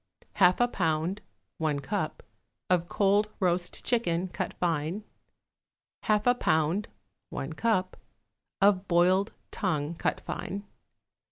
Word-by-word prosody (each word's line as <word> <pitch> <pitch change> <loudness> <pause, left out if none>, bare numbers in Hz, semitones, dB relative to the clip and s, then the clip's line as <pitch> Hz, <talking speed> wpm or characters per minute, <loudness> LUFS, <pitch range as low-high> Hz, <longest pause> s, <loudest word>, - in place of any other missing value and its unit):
1/2 180 -2 +5
a 245 - +5
pound 170 -1 -1 0.4
(1 155 -3 0
cup) 135 - -3 0.5
of 175 -1 +3
cold 205 +2 +2
roast 180 -2 0
chicken, 185 -7 +1
cut - - -3
fine. 170 +3 -1 1.0
1/2 210 -1 +2
a 245 - +6
pound 160 -2 +1 0.4
(1 140 +4 -4
cup) 185 -1 0 0.6
of 200 -1 +4
boiled 185 +3 +3 0.2
tongue, 155 -5 -1
cut 170 - -1
fine. 200 +2 -5
185 Hz, 110 wpm, -29 LUFS, 165-205 Hz, 1.0 s, a